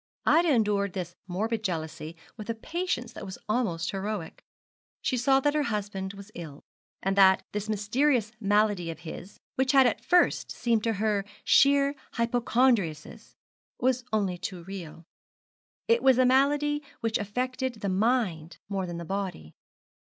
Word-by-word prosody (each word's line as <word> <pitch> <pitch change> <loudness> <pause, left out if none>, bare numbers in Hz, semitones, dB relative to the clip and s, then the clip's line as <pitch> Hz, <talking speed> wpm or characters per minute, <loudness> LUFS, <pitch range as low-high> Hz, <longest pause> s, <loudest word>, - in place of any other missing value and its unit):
Ida 335 0 +4
endured 205 -5 +1
this 175 -2 -5
morbid 220 +5 -2
jealousy 160 -3 -4 0.2
with 215 0 -9
a 230 - -1
patience 285 -2 -3
that - - -8
was 190 -1 -7
almost 195 -7 0
heroic. 195 -3 -5 0.6
She 255 - +1
saw 270 +2 +3
that 290 +1 +2
her 300 - +2
husband 205 -6 -3
was 200 +1 -12
ill, 155 -5 -9 0.4
and 195 +1 +1
that 190 -1 +6
this 210 +1 -4
mysterious 225 +3 +1
malady 205 -4 +2
of 165 - -7
his, 175 +3 -9 0.2
which 265 0 +2
had 270 -1 +7
at 230 -1 0
first 350 +7 +3
seemed 230 -3 0
to 225 - +1
her 210 -1 0 0.2
sheer 280 0 +5 0.2
hypochondriasis, 235 - 0 0.4
was 255 0 +1
only 195 -5 0
too 180 -2 -6
real. 170 -3 -8 0.8
It 465 +1 +3
was 265 -2 +5
a 255 - +5
malady 290 +3 +3 0.2
which 225 -1 0
affected 255 +4 -2
the 200 - -1
mind 190 -6 0
more 195 -2 -2
than 175 -1 -5
the 170 - -6
body. 185 - -4
210 Hz, 150 wpm, -28 LUFS, 190-255 Hz, 0.8 s, had